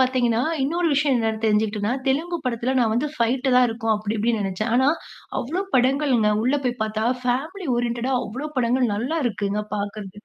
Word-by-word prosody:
பார்த்தீங்கன்னா, 250 Hz, -2 st, +2 dB, 0.2 s
இன்னொரு 335 Hz, +4 st, +1 dB
விஷயம் 280 Hz, -2 st, +2 dB
என்னன்னு 220 Hz, 0 st, -1 dB
தெரிஞ்சுகிட்டன்னா, 210 Hz, +1 st, +1 dB, 0.2 s
தெலுங்கு 335 Hz, +6 st, 0 dB
படத்தில 250 Hz, +2 st, -1 dB
நான் 225 Hz, -2 st, +2 dB
வந்து 285 Hz, +5 st, 0 dB
ஃபைட் 250 Hz, +3 st, 0 dB
தான் 250 Hz, -1 st, +6 dB
இருக்கும் 225 Hz, -1 st, 0 dB
அப்பிடி, 210 Hz, +1 st, -3 dB
இப்படின்னு 225 Hz, -2 st, +1 dB
நினைச்சேன். 215 Hz, +4 st, -2 dB
ஆனா, 260 Hz, +2 st, +4 dB, 0.5 s
அவ்ளோ 335 Hz, +10 st, -2 dB
படங்கள்ங்க. 255 Hz, -4 st, +3 dB
உள்ள 260 Hz, +3 st, +2 dB
போய் 245 Hz, -2 st, -2 dB
பார்த்தா, 215 Hz, 0 st, -2 dB, 0.2 s
ஃபேமிலி 305 Hz, +8 st, -2 dB
ஓரியன்டடா 240 Hz, +2 st, -1 dB
அவ்ளோ 265 Hz, +8 st, -5 dB
படங்கள் 245 Hz, -2 st, +2 dB
நல்லா 260 Hz, +10 st, -1 dB
இருக்குங்க. 210 Hz, -2 st, -1 dB
பார்க்கறதுக்கு. 205 Hz, 0 st, -6 dB
240 Hz, 165 wpm, -23 LUFS, 220-265 Hz, 0.5 s, தான்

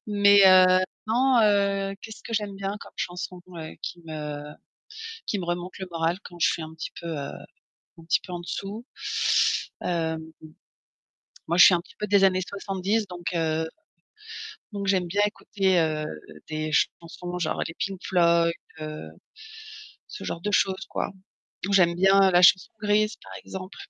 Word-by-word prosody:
Mais 200 Hz, -1 st, +6 dB
heu, 185 Hz, 0 st, +7 dB, 0.3 s
non, 250 Hz, +3 st, +3 dB
heu, 200 Hz, -1 st, +2 dB
qu'est-ce 220 Hz, -1 st, -10 dB
que 230 Hz, -, -8 dB
j'aime 210 Hz, -2 st, -1 dB
bien 195 Hz, +1 st, -3 dB
comme -, -, -11 dB
chanson, 180 Hz, 0 st, -5 dB, 0.2 s
heu, 160 Hz, -1 st, -7 dB
qui 175 Hz, -, -6 dB
me 150 Hz, -2 st, -6 dB, 0.8 s
qui 205 Hz, -, -1 dB
me 185 Hz, -, -4 dB
remonte 175 Hz, +2 st, -4 dB
le 190 Hz, -, -5 dB
moral 165 Hz, +1 st, 0 dB
quand 175 Hz, -, -11 dB
je -, -, +5 dB
suis 165 Hz, -, -4 dB
un 160 Hz, 0 st, -8 dB
petit 160 Hz, -, -6 dB
peu, 170 Hz, -, -7 dB
heu, 145 Hz, -4 st, -4 dB, 0.7 s
un 165 Hz, -, -13 dB
petit 165 Hz, -, +3 dB
peu 180 Hz, -, -9 dB
en 175 Hz, -, -4 dB
dessous? 200 Hz, +6 st, -6 dB, 1.0 s
Hem 160 Hz, -2 st, -2 dB, 1.1 s
moi, 170 Hz, +2 st, 0 dB
je 180 Hz, -, +10 dB
suis -, -, +7 dB
un 170 Hz, -, +2 dB
petit -, -, -20 dB
peu 210 Hz, -, -3 dB
des 200 Hz, -1 st, +4 dB
années 185 Hz, -1 st, +4 dB
70, 200 Hz, +2 st, -2 dB
donc 175 Hz, -1 st, -8 dB
heu 160 Hz, -1 st, 0 dB, 1.1 s
donc 200 Hz, -1 st, -4 dB
j'aime 185 Hz, -2 st, +2 dB
bien 200 Hz, +4 st, +1 dB
écouter, 195 Hz, -3 st, 0 dB
heu, 155 Hz, -2 st, 0 dB, 0.4 s
des 155 Hz, 0 st, -3 dB
chansons, 175 Hz, +3 st, -1 dB
genre 170 Hz, -, -1 dB
les 165 Hz, -, -7 dB
Pink 195 Hz, -1 st, -3 dB
Floyd, 170 Hz, -2 st, +3 dB, 0.3 s
heu, 155 Hz, -, -6 dB, 1.0 s
ce -, -, -9 dB
genre 170 Hz, -, -4 dB
de 210 Hz, -, -2 dB
choses, 190 Hz, -1 st, +1 dB
quoi. -, -, -2 dB, 0.6 s
Ou -, -, -1 dB
j'aime 175 Hz, -3 st, +5 dB
bien, 195 Hz, +2 st, +5 dB
heu, -, -, +1 dB
la 175 Hz, 0 st, +5 dB
Chanson 180 Hz, +1 st, +6 dB
grise, 210 Hz, +1 st, +2 dB
par -, -, -12 dB
exemple, 190 Hz, 0 st, -8 dB
185 Hz, 170 wpm, -26 LUFS, 170-200 Hz, 1.1 s, je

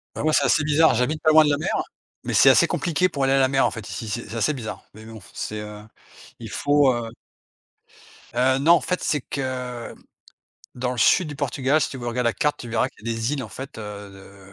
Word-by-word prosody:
Bah -, -, -4 dB
moi 155 Hz, -, +2 dB
c'est -, -, +3 dB
assez 155 Hz, -, +3 dB
bizarre, 150 Hz, 0 st, +4 dB
j'habite 145 Hz, +6 st, -1 dB
pas 155 Hz, -, +3 dB
loin 155 Hz, 0 st, +7 dB
de 150 Hz, -, +1 dB
la 145 Hz, -, +1 dB
mer, 155 Hz, -, -3 dB, 0.5 s
mais -, -, -4 dB
c'est -, -, +6 dB
assez -, -, +5 dB
compliqué 175 Hz, +1 st, 0 dB
pour 140 Hz, -5 st, -1 dB
aller 135 Hz, -, +2 dB
à -, -, +3 dB
la 130 Hz, -1 st, +3 dB
mer 135 Hz, 0 st, +2 dB
en -, -, 0 dB
fait 115 Hz, -4 st, -8 dB
ici, 115 Hz, -, -6 dB
c'est 110 Hz, +3 st, -5 dB
c'est 115 Hz, -, -6 dB
assez 150 Hz, +7 st, +1 dB
bizarre, 115 Hz, -6 st, -7 dB
mais 110 Hz, -, -13 dB
bon, 110 Hz, 0 st, -11 dB
c'est, 105 Hz, -, -5 dB
heu, 105 Hz, 0 st, -8 dB, 0.6 s
il -, -, -8 dB
faut, 145 Hz, -2 st, +2 dB
heu 120 Hz, -1 st, -4 dB, 1.2 s
Heu, 130 Hz, +1 st, +2 dB
non, 160 Hz, +5 st, +5 dB
en 170 Hz, -, +3 dB
fait, 180 Hz, -, -2 dB
c'est 150 Hz, -, 0 dB
que 125 Hz, -3 st, -5 dB, 0.8 s
dans 125 Hz, 0 st, -2 dB
le 125 Hz, -, -7 dB
sud 165 Hz, +8 st, +4 dB
du 145 Hz, -, -7 dB
Portugal, 140 Hz, +1 st, 0 dB
si -, -, -1 dB
tu 130 Hz, -, -7 dB
veux 120 Hz, -, -7 dB
regardes 120 Hz, +1 st, -2 dB
la 115 Hz, -, +2 dB
carte, 150 Hz, +1 st, -1 dB
tu 120 Hz, -, -8 dB
verras 115 Hz, -1 st, 0 dB
qu'il 110 Hz, -, -16 dB
y -, -, -1 dB
a -, -, -1 dB
des 115 Hz, +4 st, -2 dB
îles 140 Hz, -3 st, -2 dB
en 110 Hz, -, -8 dB
fait, 135 Hz, +6 st, -9 dB
heu, 105 Hz, -2 st, -8 dB
de 95 Hz, 0 st, -16 dB
130 Hz, 255 wpm, -23 LUFS, 115-145 Hz, 1.2 s, loin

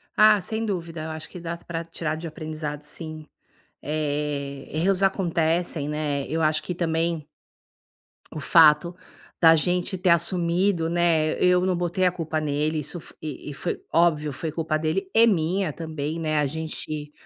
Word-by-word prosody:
Ah, 215 Hz, -1 st, +6 dB
sem 220 Hz, +5 st, -3 dB
dúvida, 170 Hz, -5 st, -4 dB
eu 160 Hz, -, -5 dB
acho 155 Hz, 0 st, -7 dB
que 180 Hz, -, -9 dB
dá 170 Hz, 0 st, -5 dB
para 170 Hz, -1 st, -5 dB
tirar 160 Hz, -2 st, -3 dB
de 165 Hz, +2 st, -6 dB
aprendizado 155 Hz, -2 st, -5 dB
sim. 155 Hz, 0 st, -7 dB, 0.6 s
Eh, 145 Hz, -2 st, -3 dB
erros 185 Hz, +5 st, +1 dB
acontecem, 170 Hz, -4 st, +1 dB
né, 150 Hz, -2 st, -2 dB
eu 160 Hz, +1 st, -1 dB
acho 155 Hz, 0 st, +2 dB
que 180 Hz, -, -4 dB
também 165 Hz, -2 st, -1 dB, 1.1 s
o -, -, -3 dB
fato 160 Hz, +3 st, +5 dB, 0.5 s
da 165 Hz, -1 st, +8 dB
gente 180 Hz, +3 st, 0 dB
ter 180 Hz, 0 st, +1 dB
assumido, 170 Hz, +1 st, +2 dB
né, 165 Hz, -2 st, +2 dB
eu 180 Hz, 0 st, +4 dB
não 185 Hz, -1 st, +1 dB
botei 175 Hz, +1 st, 0 dB
a 180 Hz, -, +4 dB
culpa 160 Hz, -2 st, -3 dB
nele, 150 Hz, +1 st, 0 dB
isso 150 Hz, +4 st, -5 dB, 0.2 s
e 150 Hz, -1 st, -6 dB
e -, -, -7 dB
foi 170 Hz, +4 st, -3 dB
óbvio 155 Hz, -3 st, +3 dB
foi 160 Hz, +4 st, -4 dB
culpa 155 Hz, 0 st, -1 dB
dele, 165 Hz, +5 st, -1 dB
e 230 Hz, +1 st, +6 dB
minha 180 Hz, -2 st, +1 dB
também, 155 Hz, 0 st, -4 dB
né, 155 Hz, -2 st, 0 dB
a 150 Hz, -, +2 dB
gente 155 Hz, -1 st, -3 dB
160 Hz, 165 wpm, -25 LUFS, 155-175 Hz, 1.1 s, da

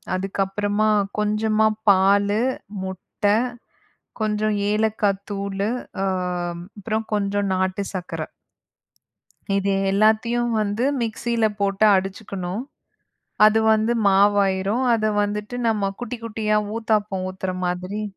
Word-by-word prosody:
அதுக்கப்புறமா 200 Hz, +2 st, -1 dB, 0.3 s
கொஞ்சமா 215 Hz, +1 st, +2 dB, 0.2 s
பாலு, 200 Hz, +2 st, +4 dB, 0.4 s
முட்ட, 190 Hz, +1 st, -9 dB, 1.0 s
கொஞ்ச 215 Hz, 0 st, 0 dB, 0.2 s
ஏலக்காய் 210 Hz, -2 st, 0 dB
தூளு 200 Hz, +1 st, -2 dB, 0.3 s
ஆ, -, -, +1 dB, 0.7 s
அப்புறம் 220 Hz, +2 st, -2 dB
கொஞ்ச 205 Hz, 0 st, 0 dB
நாட்டு 190 Hz, +1 st, 0 dB
சக்கர. 180 Hz, -2 st, -5 dB, 1.3 s
இது 200 Hz, 0 st, 0 dB, 0.2 s
எல்லாத்தையும் 220 Hz, +4 st, +2 dB
வந்து 210 Hz, +3 st, -1 dB, 0.2 s
மிக்ஸியில 230 Hz, 0 st, 0 dB
போட்டு 200 Hz, +1 st, +2 dB
அடிச்சுக்கணும். 195 Hz, 0 st, -3 dB, 0.9 s
அது 220 Hz, +1 st, +3 dB
வந்து 220 Hz, +2 st, +2 dB, 0.2 s
மாவாயிரும். 200 Hz, +2 st, +3 dB
அத 215 Hz, -, -1 dB, 0.2 s
வந்துட்டு 210 Hz, +3 st, -4 dB
நம்ம 205 Hz, -3 st, +1 dB
குட்டி, 245 Hz, 0 st, -4 dB
குட்டியா 215 Hz, -1 st, 0 dB, 0.2 s
ஊத்தாப்பம் 210 Hz, -4 st, 0 dB
ஊத்துற 185 Hz, 0 st, -4 dB
மாதிரி 180 Hz, +4 st, -3 dB
205 Hz, 95 wpm, -22 LUFS, 195-220 Hz, 1.3 s, பாலு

